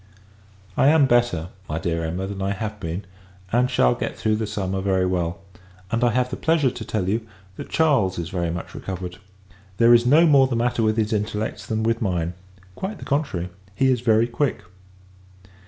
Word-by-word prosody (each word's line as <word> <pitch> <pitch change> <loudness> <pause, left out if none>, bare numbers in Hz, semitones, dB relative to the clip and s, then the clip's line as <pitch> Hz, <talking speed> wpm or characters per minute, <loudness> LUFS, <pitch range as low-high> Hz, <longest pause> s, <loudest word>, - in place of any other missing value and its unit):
I - - +4
am 150 -1 +6
better, 120 -10 +1 0.2
my 75 - -2
dear 85 0 -2
Emma, 90 +4 -3
than 100 0 -6
I 100 +1 0
have 105 +1 -5
been, 85 +4 -4 0.5
and 125 +2 +2
shall 60 - +3
get - - -4
through 110 -1 +1
the 110 -1 -2
summer 95 -2 -2
very 95 -1 +1
well; 90 -1 -1 0.5
and 115 +1 0
I 120 - +5
have 125 +2 0
the - - -3
pleasure 160 -5 +2
to 120 - -7
tell 105 -4 -2
you, 110 +3 -1 0.3
that - - -8
Charles 135 -13 +2
is 85 0 -4
very 85 -2 -1
much 85 0 -5
recovered. 90 -1 -6 0.6
There 115 0 +6
is 120 0 +5
no 155 +6 +6
more 140 -4 +6
the 125 - -2
matter 120 0 0
with 110 0 +1
his 110 0 +1
intellects, 105 +1 -3
than 110 0 -1
with 115 +1 0
mine! 90 -5 -1 0.4
Quite 190 - -5
the - - -10
contrary; 135 - -1 0.3
he 130 +2 +3
is 125 -3 0
very 115 -1 +4
quick. 125 +3 -1
110 Hz, 195 wpm, -23 LUFS, 95-120 Hz, 0.6 s, am